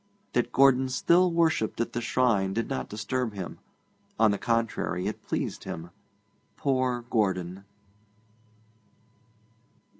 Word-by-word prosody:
That 120 Hz, 0 st, +1 dB
Gordon 130 Hz, -1 st, +4 dB
still 170 Hz, +8 st, +3 dB
worshipped 165 Hz, -9 st, +1 dB
at 115 Hz, -, -1 dB
the 120 Hz, -, -2 dB
shrine 115 Hz, -6 st, +1 dB
did 115 Hz, +3 st, -1 dB
not 135 Hz, -, -3 dB
disturb 110 Hz, +1 st, -2 dB
him; 95 Hz, -3 st, -6 dB, 0.6 s
on 110 Hz, -2 st, +5 dB
the 100 Hz, -, -2 dB
contrary, 115 Hz, -6 st, -1 dB
it 105 Hz, -, -3 dB
pleased -, -, -3 dB
him. 85 Hz, +2 st, -6 dB, 0.7 s
Poor 130 Hz, -3 st, 0 dB
Gordon! 95 Hz, -3 st, 0 dB
115 Hz, 115 wpm, -27 LUFS, 100-130 Hz, 0.7 s, on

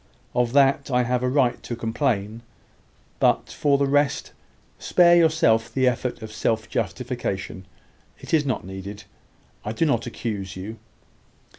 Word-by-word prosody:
Of 125 Hz, 0 st, +1 dB
that 140 Hz, +1 st, +3 dB
I 125 Hz, -1 st, +2 dB
have 125 Hz, 0 st, 0 dB
a 125 Hz, -, +1 dB
right 130 Hz, -2 st, +1 dB
to 120 Hz, -, -5 dB
complain: 115 Hz, -2 st, -1 dB, 0.8 s
but, -, -, +2 dB
for 140 Hz, -1 st, +2 dB
the 140 Hz, -, +2 dB
rest, 145 Hz, +1 st, +1 dB, 0.5 s
spare 175 Hz, -1 st, +5 dB
yourself 140 Hz, -9 st, +3 dB
the 130 Hz, +2 st, +2 dB
effort 125 Hz, -1 st, -1 dB
of 110 Hz, -, -7 dB
self 110 Hz, 0 st, -1 dB
justification. 95 Hz, -1 st, -4 dB, 0.5 s
It -, -, -9 dB
is 155 Hz, -2 st, +4 dB
not 130 Hz, -9 st, -2 dB
needed. 95 Hz, +2 st, -8 dB, 0.6 s
I 105 Hz, -, -4 dB
do 165 Hz, -, +1 dB
not 120 Hz, -6 st, 0 dB
accuse 105 Hz, -5 st, -5 dB
you. 105 Hz, +4 st, -7 dB
120 Hz, 145 wpm, -24 LUFS, 110-140 Hz, 0.8 s, spare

